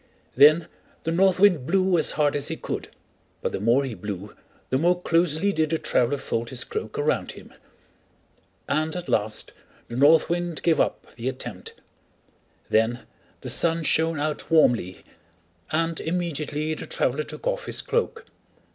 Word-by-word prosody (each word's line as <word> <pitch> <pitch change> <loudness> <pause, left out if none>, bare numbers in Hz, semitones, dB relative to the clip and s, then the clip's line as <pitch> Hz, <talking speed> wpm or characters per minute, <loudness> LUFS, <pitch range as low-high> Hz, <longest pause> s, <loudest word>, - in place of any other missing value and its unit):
Then 155 +3 +6 0.4
the 165 - -1
North 185 +2 +3
Wind 180 -10 +4
blew 190 0 +2
as 160 - +2
hard 150 -1 +1
as 145 - -1
he - - -3
could, - - -5 0.6
but - - 0
the - - -3
more 120 +7 +3
he 130 -3 -4
blew 100 0 -7 0.4
the 130 - +2
more 175 +3 +2
closely 170 +3 +1
did 155 -3 +1
the 165 - +1
traveler 135 -2 +1
fold 115 -3 -3
his 130 -2 -3
cloak 435 0 -5
around 455 +2 0
him; - - -14 1.1
and 155 +3 0
at 180 -1 -5
last 105 0 -1 0.4
the 120 - -6
North 145 +5 +5
Wind 175 -1 -2
gave 165 -2 +3
up - - -1
the 120 +2 -2
attempt. 120 -7 -6 0.9
Then 115 +2 +1 0.4
the - - -4
Sun 165 -1 +2
shined 160 0 +1
out 150 0 -3
warmly, 120 - +3 0.7
and 165 +1 0
immediately 155 -3 -2
the - - -7
traveler 135 +4 0
took 150 - -9
off - - -1
his - - -2
cloak. 470 -1 -1
155 Hz, 160 wpm, -25 LUFS, 130-175 Hz, 1.1 s, Then